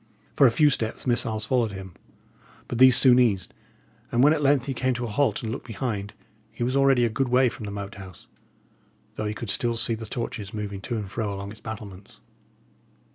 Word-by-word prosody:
For 135 Hz, -, +6 dB
a -, -, +3 dB
few 150 Hz, +5 st, +4 dB
steps 110 Hz, -4 st, -3 dB
missiles 115 Hz, -3 st, 0 dB
followed 115 Hz, -2 st, 0 dB
him, 95 Hz, -2 st, -8 dB, 0.7 s
but 120 Hz, -, -4 dB
these 130 Hz, -1 st, +8 dB
soon 125 Hz, -2 st, +6 dB
ceased; 110 Hz, -7 st, +1 dB, 0.6 s
and 120 Hz, +2 st, +3 dB
when 150 Hz, +2 st, +6 dB
at 155 Hz, -, -1 dB
length 140 Hz, -2 st, +3 dB
he 135 Hz, -, -3 dB
came 130 Hz, 0 st, -1 dB
to 120 Hz, -, -4 dB
a -, -, -5 dB
halt 135 Hz, +4 st, 0 dB
and 110 Hz, -, -3 dB
looked 125 Hz, -, -6 dB
behind, 105 Hz, -3 st, -4 dB, 0.4 s
he -, -, -5 dB
was 125 Hz, +2 st, -1 dB
already 135 Hz, -3 st, +4 dB
a -, -, +3 dB
good 125 Hz, +3 st, -1 dB
way 125 Hz, +1 st, +4 dB
from 110 Hz, -, -9 dB
the -, -, -5 dB
Moat 100 Hz, 0 st, -6 dB
House, 95 Hz, -3 st, -12 dB, 0.9 s
though 110 Hz, -, -4 dB
he 105 Hz, -, -3 dB
could 110 Hz, -2 st, -4 dB
still 120 Hz, +3 st, 0 dB
see 115 Hz, 0 st, +2 dB
the 110 Hz, 0 st, -6 dB
torches 110 Hz, -4 st, -5 dB
moving 100 Hz, -2 st, -5 dB
to 115 Hz, +4 st, -3 dB
and 100 Hz, -3 st, -6 dB
fro 110 Hz, -2 st, -2 dB
along 100 Hz, 0 st, -6 dB
its 110 Hz, -, -13 dB
battlements. 105 Hz, -3 st, -9 dB
115 Hz, 215 wpm, -25 LUFS, 105-125 Hz, 0.9 s, these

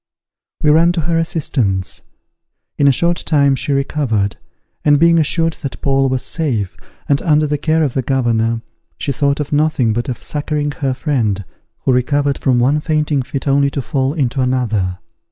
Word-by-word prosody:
We 150 Hz, -, +5 dB
ran 165 Hz, +3 st, +4 dB
to 170 Hz, -, -1 dB
her 165 Hz, +1 st, 0 dB
assistance. 125 Hz, -, -1 dB, 0.7 s
In 140 Hz, -, +3 dB
a -, -, +7 dB
short 170 Hz, +5 st, +1 dB
time 140 Hz, -3 st, +2 dB
she 145 Hz, +2 st, -1 dB
recovered, 135 Hz, -7 st, 0 dB, 0.5 s
and 145 Hz, 0 st, +5 dB
being 170 Hz, +2 st, +4 dB
assured 165 Hz, +1 st, +1 dB
that 140 Hz, -4 st, -5 dB
Paul 135 Hz, -1 st, +2 dB
was 130 Hz, -1 st, -1 dB
safe, 120 Hz, -, -1 dB, 0.3 s
and 140 Hz, -1 st, +2 dB
under 155 Hz, -2 st, +3 dB
the 150 Hz, 0 st, -1 dB
care 160 Hz, +1 st, +1 dB
of 140 Hz, -5 st, -1 dB
the 135 Hz, -, 0 dB
governor, 115 Hz, -3 st, 0 dB, 0.3 s
she 140 Hz, -, -2 dB
thought 140 Hz, +1 st, 0 dB
of 150 Hz, 0 st, -3 dB
nothing 145 Hz, -6 st, +2 dB
but 120 Hz, +4 st, -2 dB
of 125 Hz, -, -5 dB
succouring 150 Hz, 0 st, -2 dB
her 135 Hz, -2 st, 0 dB
friend, 115 Hz, -, -1 dB, 0.4 s
who 130 Hz, -, +2 dB
recovered 140 Hz, +2 st, +1 dB
from 130 Hz, -2 st, +2 dB
one 135 Hz, +5 st, +2 dB
fainting 150 Hz, -2 st, 0 dB
fit 135 Hz, +3 st, -5 dB
only 140 Hz, 0 st, +3 dB
to 140 Hz, -, -3 dB
fall 135 Hz, -1 st, -1 dB
into 135 Hz, -3 st, 0 dB
another. 110 Hz, -8 st, 0 dB
140 Hz, 175 wpm, -17 LUFS, 125-150 Hz, 0.7 s, a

